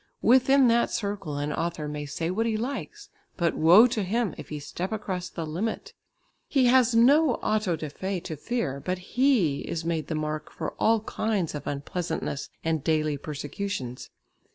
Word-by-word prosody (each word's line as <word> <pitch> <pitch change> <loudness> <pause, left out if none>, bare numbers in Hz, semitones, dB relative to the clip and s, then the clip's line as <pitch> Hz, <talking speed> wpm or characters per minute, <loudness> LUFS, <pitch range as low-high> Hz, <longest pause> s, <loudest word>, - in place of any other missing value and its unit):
Within 260 +2 +5
that 235 +1 +3
circle 200 -9 -3
an 145 +1 -2
author 165 -3 -2
may 150 0 -5
say 165 +4 -2
what 225 +5 0
he 220 -1 0
likes, 280 - -5 0.3
but 170 -2 +1
woe 175 +9 +7
to 235 -3 0
him 205 -1 0
if - - -10
he 150 - -4
step 170 +6 -5
across 190 -4 -3
the 165 - -5
limit. 220 - -3 0.5
He 270 -3 +3
has 250 -1 +4
no 270 +3 +5
auto 215 -5 0
da 155 - -5
fé 190 +4 -4
to 160 - -5
fear, 150 - -2
but 185 0 -1
he 190 - +2
is 165 -1 -4
made 165 -2 -1
the 160 - -2
mark 155 0 -3
for - - -4
all 225 0 +3
kinds 215 -5 -1
of 150 - -6
unpleasantness 155 +1 -3
and 160 -3 0
daily 155 -2 +1
persecutions. 145 -2 -5
180 Hz, 175 wpm, -27 LUFS, 155-230 Hz, 0.5 s, woe